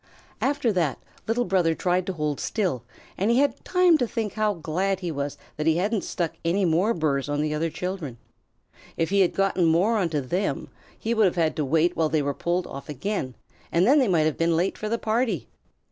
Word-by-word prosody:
After 270 -5 +1
that 165 -7 0 0.3
Little 235 +2 +1
Brother 175 -3 +2
tried 180 +1 0
to 190 - -1
hold 150 -4 -2
still, 185 - -1 0.4
and 200 +4 +1
he 235 - +4
had 285 +1 +1
time 360 -3 +4
to 245 - +1
think 220 -3 -3
how 215 -2 +1
glad 180 +4 -1
he 175 -2 -2
was 145 -1 -3 0.2
that 150 +1 -1
he 160 0 +4
hadn't 205 +3 0
stuck 170 -3 -2
any 180 +4 +1
more 180 +7 +2
burrs 145 -4 0
on 145 0 -1
the 150 0 0
other 160 +2 0
children. 175 -8 -5 0.8
If 165 +2 0
he 200 - +3
had 180 - +2
gotten 195 -2 +2
more 180 +8 +3
onto 165 -6 0
them, 180 +10 -2 0.3
he 230 - -1
would 220 -2 +4
have 185 - +1
had 165 -3 +1
to 150 - 0
wait 160 +5 +2
while 160 -1 +1
they 150 -1 +1
were 140 0 -1
pulled 175 +4 -1
off 140 +1 -9
again, 145 - -3 0.4
and 170 +2 +3
then 280 +6 +5
they 260 - +3
might 165 -5 +3
have 155 - -1
been 165 0 +2
late 180 +3 0
for 215 - -4
the 230 - 0
party. 220 - -1
175 Hz, 220 wpm, -25 LUFS, 155-210 Hz, 0.8 s, then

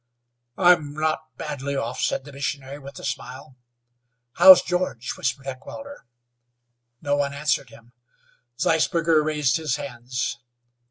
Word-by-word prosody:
"I'm 175 -5 +4
not 155 0 -2
badly 140 -2 -4
off," 125 -2 -3
said - - 0
the 145 - -11
missionary 140 0 -4
with 140 0 -11
a - - -10
smile. 130 +2 -6 0.8
"How's 190 -1 +9
George?" 180 -9 -2
whispered 135 +2 -3
Heckewelder. 280 - -9 1.0
No 145 -1 +1
one 140 -1 -1
answered 140 -3 0
him. 115 +1 -18 0.7
Zeisberger 165 -1 +2
raised 150 -2 +1
his 155 -4 -1
hands. 130 -1 -4
145 Hz, 120 wpm, -24 LUFS, 130-155 Hz, 1.0 s, How's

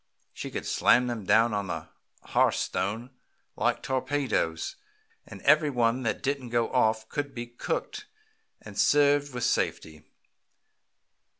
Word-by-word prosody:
She - - -6
could - - -5
slam 125 - +4
them 120 -5 -4
down 110 +3 +4
on 100 -1 -2
the - - -5 0.3
hearth - - +2
stone 110 +7 -2 0.4
like - - 0
torpedoes, 130 - -1 0.5
and 100 - -11
every 150 +1 +5
one 120 -1 +1
that 115 -4 -2
didn't 135 -2 -2
go 120 -1 0
off 110 -3 +2
could 145 +1 -4
be 120 0 -4
cooked 120 - -4 0.6
and - - -8
served 145 0 +4
with 125 -2 -4
safety. 80 -1 -1
120 Hz, 130 wpm, -27 LUFS, 110-140 Hz, 0.6 s, every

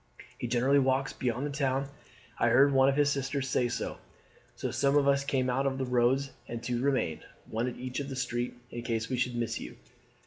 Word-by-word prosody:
He - - -2
generally 125 +4 +3
walks 135 0 +1
beyond 125 +1 -2
the 145 - -3
town. 135 -1 0 0.5
I - - +3
heard 135 +4 +5
one 135 0 +5
of 135 - +1
his 145 0 +3
sisters 135 0 -1
say 125 -1 +1
so.' - - -4 0.6
So - - -3
some 140 +1 +2
of 140 -1 +3
us 140 0 +3
came 135 -2 0
out 135 +2 +1
on 135 - +1
all - - -6
the 135 - -1
roads, 125 +2 +2 0.2
and 115 0 -6
two 120 0 -1
remained, 130 - 0 0.2
one 115 +3 -1
at 125 - -4
each 125 +1 -4
end 140 - -3
of - - -8
the 135 - -5
street, 120 -1 -2 0.2
in 120 - -5
case 115 -1 -2
we 130 - -1
should 125 0 0
miss 120 -1 -2
you. - - -8
130 Hz, 235 wpm, -30 LUFS, 120-140 Hz, 0.6 s, heard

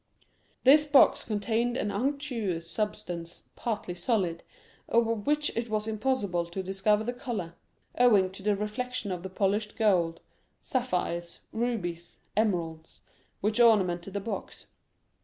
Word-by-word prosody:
This 290 +3 +7
box 290 -2 +5
contained 230 +3 0
an 210 - -1
unctuous 230 - -2
substance 175 -5 -4
partly 215 -6 -3
solid, 175 -2 0 0.5
of 230 -1 +1
which 295 0 +1
it 230 0 -2
was 215 0 -1
impossible 210 -6 0
to 190 +3 -5
discover 195 +3 +1
the 245 +2 -2
color, 230 -9 -4 0.4
owing 210 -7 +5
to 195 - -9
the 205 +1 +2
reflection 210 +2 -3
of 180 -1 -3
the 190 - -6
polished 205 +2 0
gold, 175 -7 +2 0.4
sapphires, 180 -9 -2
rubies, 195 -8 -3 0.2
emeralds, 170 -7 -1 0.4
which 215 +3 0
ornamented 195 -5 +3
the - - +1
box. 220 +3 -6
210 Hz, 125 wpm, -29 LUFS, 180-235 Hz, 0.5 s, This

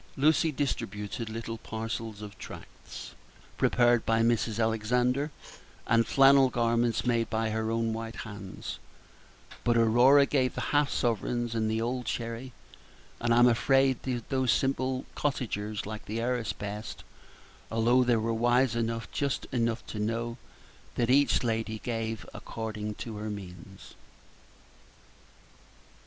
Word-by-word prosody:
Lucy 155 +3 +3
distributed 115 -5 -3
little 115 0 -5
parcels 110 -1 -5
of 105 -1 -9
tracts - - -10 0.4
prepared 120 -1 +3
by 115 0 +2
Mrs. 115 -1 +1
Alexander, 125 +5 +1 0.6
and 115 0 +3
flannel 135 -1 +6
garments 115 0 +1
made 115 -2 +1
by 110 0 0
her 110 0 -1
own 115 0 0
white 115 0 -5
hands; 105 -4 -7 0.8
but 120 -1 +3
Aurora 120 +5 +6
gave 130 -3 +1
the - - -3
half 145 -1 +4
sovereigns 120 0 -1
and 110 -1 0
the 110 +1 0
old 120 +1 -2
sherry; 115 +3 -4 0.7
and 120 0 0
I'm 120 +1 +6
afraid 135 +2 +3
these 125 -3 -3 0.3
simple 130 -1 0
cottagers 110 -6 -2
liked 110 +1 -7
the 110 +2 -3
heiress 120 -1 -1
best, 105 +2 -6 0.7
although 120 +3 +3
they 120 -1 +3
were 115 +1 0
wise 120 +2 +2
enough 115 0 -1
and - - -21
just 140 -2 -1
enough 115 -2 0
to 105 - -6
know 115 +2 -2 0.6
that 120 0 +1
each 140 0 +4
lady 110 -1 -1
gave 115 -1 -3
according 105 -2 -5
to 110 -1 -6
her 105 +1 -4
means. 95 -1 -9
115 Hz, 130 wpm, -29 LUFS, 110-125 Hz, 0.8 s, flannel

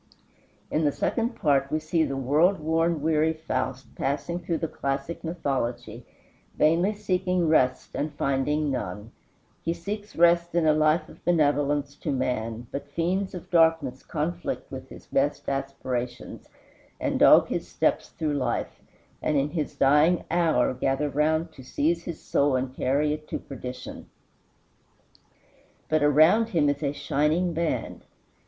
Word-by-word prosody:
In 155 - +1
the 145 - +3
second 235 - -1
part 140 -3 +2
we 155 - +2
see 155 +1 0
the 135 -3 -2
world 150 +9 +3
worn, 160 0 0
weary 160 0 +2
Faust 130 -5 -4
passing 150 +5 -2
through 170 -1 -2
the 160 - -2
classic 140 +3 -4
mythology, 125 -8 -3 0.5
vainly 170 +7 +3
seeking 185 -3 0
rest 130 -5 +2
and 150 +1 -2
finding 145 +2 0
none; 105 -3 -5 0.5
he 165 +1 -1
seeks 205 +5 -6
rest 170 0 +3
in 170 -2 +3
a 155 - +5
life 155 +1 +2
of - - -16
benevolence 145 -3 +1
to 155 - -3
man, 120 -3 -2
but 140 +1 -6
fiends 185 +6 -1
of 180 - -9
darkness 160 -6 +3
conflict 170 +3 -4
with - - -8
his - - -12
best - - -1
aspirations, 130 -3 -4 0.5
and - - -1
dog - - +7
his - - -3
steps - - 0
through 155 -2 -2
life, 130 -4 -2 0.4
and 150 - +1
in 140 +2 0
his 155 -4 -3
dying 150 +5 +4
hour 165 -8 +2
gather 135 +3 0
round 155 +3 +1
to 135 - -13
seize 165 +6 -1
his 170 -3 -5
soul 140 -1 +1
and 130 0 -2
carry 145 +3 +1
it 150 0 -7
to - - -3
perdition. 125 -2 -8 1.8
But 155 -1 +2
around 155 +10 +5
him 155 -7 +2
is 145 +1 -1
a 140 -2 0
shining 150 +5 0
band. 165 0 -2
150 Hz, 150 wpm, -26 LUFS, 135-165 Hz, 1.8 s, dog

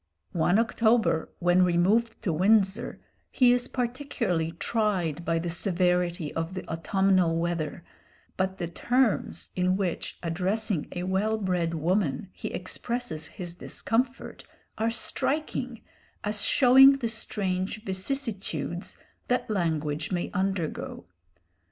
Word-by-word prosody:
One 175 +2 +3
October, 225 -6 +2
when 175 +1 +3
removed 195 +7 +2
to 180 -7 0
Windsor, 195 +3 +2 0.3
he 245 -2 +5
is 245 0 0
particularly 235 - -2
tried 180 -5 -1
by 165 -1 0
the 165 +1 -2
severity 180 -2 +1
of 165 +3 -3
the 185 - -6
autumnal 180 0 +2
weather, 170 -1 -2 0.5
but 190 0 -1
the 175 - -3
terms 240 +7 0
in 185 +1 +2
which, 185 -4 -3
addressing 185 +2 -1
a 175 - -3
well 195 +4 0
bred 180 -5 -1
woman, 170 -1 0
he - - -6
expresses 180 -4 -4
his 175 +1 -7
discomfort 240 +8 -2 0.3
are 225 +1 0
striking, 250 +1 -2 0.4
as 210 0 -1
showing 270 +2 +7
the 270 -4 -2
strange 205 -2 -3
vicissitudes 190 - -3 0.3
that 250 -2 0
language 155 -5 -1
may 175 -2 -2
undergo. 185 - -2
190 Hz, 115 wpm, -27 LUFS, 170-225 Hz, 0.5 s, showing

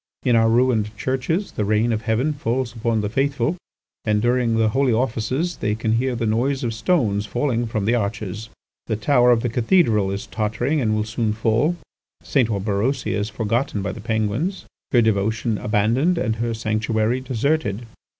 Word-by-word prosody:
In 125 -3 +3
our 115 0 +4
ruined 115 -3 +2
churches 160 - -1
the 105 - -2
rain 110 +3 +2
of 110 - -2
heaven 115 +7 0
falls 125 -3 -2
upon 115 -1 0
the 105 - -1
faithful, 140 - 0 0.5
and 105 -1 +1
during 120 0 +1
the 110 -1 +3
holy 130 +2 +2
offices 130 +8 -1
they 105 0 -1
can 110 0 -1
hear 130 +1 0
the 115 - -2
noise 125 +5 0
of 115 -2 -1
stones 110 - 0
falling 120 +2 -1
from 110 -3 -2
the 115 - +2
arches. 110 -1 -3 0.4
The 110 - 0
tower 120 +3 +3
of 120 -2 +4
the 120 - 0
cathedral 115 - +2
is 100 +1 -4
tottering 115 +8 -1
and 110 -3 +1
will 105 - 0
soon 110 0 -1
fall. 115 +9 +1 0.5
St. 125 -5 +1
Orberosia 105 +6 -1
is 105 +1 -2
forgotten 110 0 -1
by 100 - -2
the - - -9
Penguins, 115 - -1 0.3
her 120 -2 +4
devotion 110 +1 0
abandoned, 115 - +1
and 110 -8 -1
her 115 0 -1
sanctuary 110 +2 0
deserted. 130 -3 -1
115 Hz, 175 wpm, -22 LUFS, 110-130 Hz, 0.5 s, our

